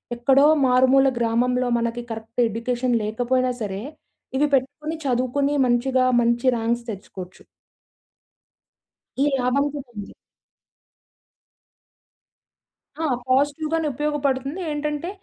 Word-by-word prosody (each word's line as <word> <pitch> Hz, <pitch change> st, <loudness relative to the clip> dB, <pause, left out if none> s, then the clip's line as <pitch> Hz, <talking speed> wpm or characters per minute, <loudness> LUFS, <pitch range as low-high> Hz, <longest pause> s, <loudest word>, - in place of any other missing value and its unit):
ఎక్కడో 270 Hz, +4 st, +4 dB, 0.2 s
మారుమూల 260 Hz, +2 st, +4 dB
గ్రామంలో 245 Hz, +2 st, +1 dB
మనకి 235 Hz, +1 st, -2 dB
కరెక్ట్ 225 Hz, +2 st, -4 dB
ఎడ్యుకేషన్ 240 Hz, +2 st, -1 dB
లేకపోయినా 245 Hz, +4 st, 0 dB
సరే 200 Hz, -1 st, -4 dB, 0.6 s
ఇవి 295 Hz, +1 st, +3 dB
పెట్టుకొని 290 Hz, +4 st, -1 dB
చదువుకొని 265 Hz, +3 st, 0 dB
మంచిగా, 255 Hz, +1 st, +2 dB, 0.2 s
మంచి 235 Hz, +2 st, 0 dB
ర్యాంక్స్ 235 Hz, +1 st, -1 dB
తెచ్చుకోవచ్చు. 185 Hz, -2 st, -10 dB, 1.8 s
ఈ -, -, +5 dB, 0.2 s
లాభం 255 Hz, +3 st, +1 dB
కూడుంది. 240 Hz, -8 st, -8 dB, 2.9 s
ఆ! -, -, -1 dB, 0.2 s
పాజిటివ్‌గానే 300 Hz, +4 st, +1 dB
ఉపయోగపడుతుంది. 285 Hz, +2 st, -2 dB
ఏంటంటే 295 Hz, +3 st, -3 dB
255 Hz, 85 wpm, -23 LUFS, 235-280 Hz, 2.9 s, ఈ